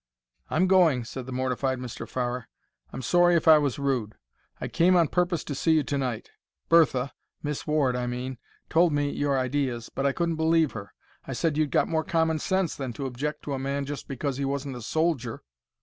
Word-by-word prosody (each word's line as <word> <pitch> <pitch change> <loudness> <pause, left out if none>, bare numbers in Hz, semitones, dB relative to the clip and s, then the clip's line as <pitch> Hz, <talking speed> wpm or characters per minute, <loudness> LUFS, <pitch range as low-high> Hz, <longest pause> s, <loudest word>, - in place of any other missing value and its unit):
"I'm 175 +4 +2
going," 175 -9 +4
said 125 +2 -7
the - - -6
mortified 130 +1 -1
Mr. 120 -2 -7
Farrer. 125 -1 -3 0.4
"I'm 130 - -6
sorry 175 +2 +4
if 165 0 +1
I 155 -1 +9
was 140 -4 -1
rude. 130 -7 -1 0.4
I - - -3
came 175 +2 +3
on 170 -3 +4
purpose 175 -1 0
to 145 - -5
see 160 +4 +2
you 155 -2 +3
to 140 - -2
night. 125 -5 -3 0.4
Bertha—Miss 145 -2 +1
Ward, 145 -5 +2
I 125 0 -2
mean—told 130 +6 -1
me 145 0 +1
your 145 -1 0
ideas, 130 -3 -1
but 140 - 0
I - - +3
couldn't 170 +2 -1
believe 160 -1 +3
her. 100 -2 -9 0.3
I - - -4
said 160 -3 0
you'd 155 -1 +1
got - - +2
more 160 -1 0
common 160 -1 +1
sense 190 -2 0
than 130 -3 -4
to 140 - -5
object 145 +4 -4
to 145 - -4
a 135 - -2
man 140 +1 -2
just 145 0 -6
because 135 0 -3
he 140 - -2
wasn't 140 -1 -3
a 120 - -7
soldier." 140 -3 -1
140 Hz, 200 wpm, -27 LUFS, 130-160 Hz, 0.4 s, I